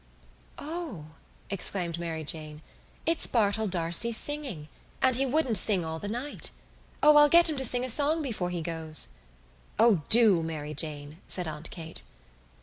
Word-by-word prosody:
"O," 295 - -7 0.4
exclaimed 175 -3 -2
Mary 165 -2 -4
Jane. 155 0 -5 0.4
"It's 330 0 +4
Bartell 220 -2 +1
D'Arcy 175 +5 +2
singing 250 - -4 0.3
and 260 -1 +3
he 270 +2 +1
wouldn't 255 -6 0
sing 190 -5 +1
all 160 0 -4
the 205 - -5
night. 245 +7 -4 0.5
O, 300 0 +7
I'll 295 0 +7
get 340 +3 +7
him 310 -3 +1
to 265 - -1
sing 250 +1 -1
a - - 0
song 300 +5 +1
before 210 -10 -3
he 175 -2 -4
goes." 160 - -1 0.7
"O 220 -6 +4
do, 220 -7 +7
Mary 155 -2 -5
Jane," 150 0 -3
said 180 -3 -3
Aunt 155 +1 -7
Kate. 160 -2 -7
195 Hz, 155 wpm, -27 LUFS, 160-260 Hz, 0.7 s, O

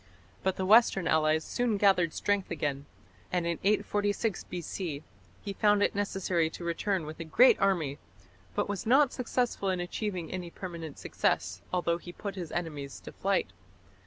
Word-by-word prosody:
But 190 -1 0
the 190 - -2
western 200 -4 +5
allies 155 0 +3
soon 240 -4 0
gathered 190 -5 +4
strength 205 +2 0
again, 145 -3 -2 0.4
and 180 -2 0
in 170 -1 -1
846 205 +1 0
B.C. 170 -3 -5 0.4
he 200 - -4
found 205 0 +3
it - - +2
necessary 190 -4 0
to 170 - -9
return 170 +1 -1
with 155 +2 -8
a - - -3
great 235 +11 +5
army, 165 -8 +1 0.6
but - - 0
was 205 0 -4
not 270 +3 +5
successful 245 -5 -1
in 185 -1 0
achieving 180 -1 -3
any 180 -2 -4
permanent 170 -4 -7
success, 90 +2 -1
although 175 -2 +1
he 175 - -9
put 200 +3 -6
his 180 -4 -6
enemies 150 -5 -4
to - - -9
flight. 195 - 0
180 Hz, 160 wpm, -30 LUFS, 165-205 Hz, 0.6 s, western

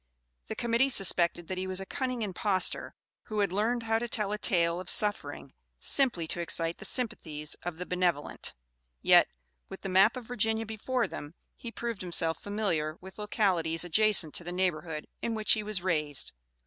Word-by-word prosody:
The - - -4
Committee 235 +3 +1
suspected 175 -6 +3
that 185 -1 -4
he 190 - -3
was 185 0 -1
a 195 - -6
cunning 255 +1 -3
impostor 190 -1 -1 0.3
who 215 - -5
had 200 -3 +1
learned 225 +5 0
how 225 0 +1
to 240 - -3
tell 210 -3 0
a 210 - -1
tale 170 -3 +2
of 185 - -5
suffering 210 0 -1 0.2
simply 250 - +2
to - - -2
excite 165 0 0
the - - -6
sympathies 155 - -3
of 175 -2 -5
the 180 - -5
benevolent; 180 -5 -1 0.5
yet, - - +6 0.4
with - - -9
the 195 - -5
map 195 +6 +4
of 250 - -7
Virginia 225 -1 0
before 230 +3 -1
them, 150 +3 -8 0.2
he 235 - -8
proved 235 -3 -4
himself 170 -2 +2
familiar 175 -7 -1
with 190 +2 -12
localities 180 -6 +1
adjacent 180 -3 +4
to - - -2
the 175 - -6
neighborhood 175 -4 -2 0.2
in 230 -1 -2
which 215 -1 +4
he 215 - 0
was 210 -4 -1
raised. 150 -6 0
190 Hz, 180 wpm, -29 LUFS, 170-220 Hz, 0.5 s, yet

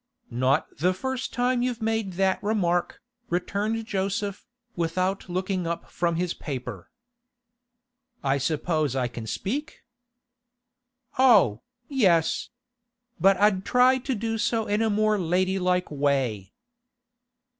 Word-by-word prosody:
'Not 130 +5 0
the 180 +5 +1
first 260 +6 -3
time 245 +1 +1
you've 245 -2 -1
made 220 -3 -1
that 190 +1 +1
remark,' 180 -5 0 0.3
returned 205 +6 -1
Joseph, 200 -1 -2 0.3
without 185 +3 -1
looking 185 0 -2
up 170 0 -4
from 170 -1 0
his 175 0 -1
paper. 130 -4 -6 1.3
'I 135 0 +1
suppose 155 -1 0
I 130 -2 +1
can 115 -2 -8
speak?' 265 - -4 1.4
'Oh, 200 - +5 0.3
yes. 185 - +2 0.7
But 195 +3 +5
I'd 200 -2 +3
try 250 +4 +4
to 260 0 -2
do 225 +1 -2
so 225 0 0
in 210 +1 0
a 225 - +2
more 215 0 +2
ladylike 180 0 +1
way. 135 -9 0
190 Hz, 115 wpm, -26 LUFS, 165-220 Hz, 1.4 s, Oh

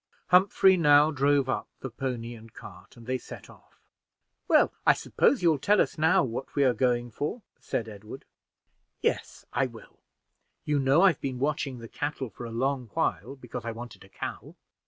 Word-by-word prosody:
Humphrey 190 +1 +5
now 150 -2 +5
drove 140 -1 +2
up 135 - -2
the 130 - -6
pony 120 -2 -4
and 115 -1 -13
cart, 90 +3 -13
and 115 - -13
they 130 +1 -2
set - - -11
off. - - -22 0.7
"Well, - - +4
I - - +6
suppose 255 -10 +1
you'll 160 -4 +3
tell 205 +7 +3
us - - +1
now 160 +2 +3
what 130 +1 -5
we 140 - +3
are 130 -2 +4
going 120 0 0
for?" 150 - -4 0.2
said 115 - -3
Edward. 110 +4 -10 0.8
"Yes, - - -2
I - - +1
will. - - -15 0.7
You 150 -1 +1
know 135 +6 +4
I've 185 -7 +4
been 130 -2 -3
watching 140 -1 -2
the 115 -1 -9
cattle 140 -2 -4
for 120 - -9
a - - -8
long 130 +1 -1
while, 100 +10 -1
because 125 -2 -8
I 115 0 -4
wanted 120 -1 -10
a 100 - -17
cow. - - -7
130 Hz, 180 wpm, -27 LUFS, 120-145 Hz, 0.8 s, I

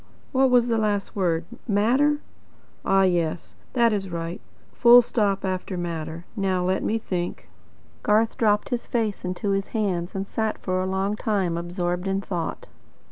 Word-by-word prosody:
What 265 -1 +4
was 245 -1 +4
the 230 -2 +1
last 205 -2 -1
word? 170 -4 0 0.2
'Matter?' 255 +8 +3 0.6
Ah 195 0 +4
yes. 170 -3 0 0.2
That 235 -3 +4
is 195 -2 -2
right. 170 0 -4 0.3
Full 240 +1 +8
stop 205 -5 0
after 185 0 -3
'matter.' 165 -1 -4
Now 190 -3 0
let 185 +1 +1
me 225 - 0
think." 180 -5 -4 0.5
Garth 220 +2 +2
dropped 210 -2 +2
his 245 -1 -3
face 220 -4 -1
into 185 +2 -2
his 195 0 0
hands, 185 -4 -1
and 195 0 -2
sat 220 +2 -2
for 185 -1 -1
a 185 - -1
long 195 +2 0
time 200 -6 0
absorbed 175 +1 -2
in 195 0 0
thought. 175 -4 -4
195 Hz, 160 wpm, -24 LUFS, 180-220 Hz, 0.6 s, Full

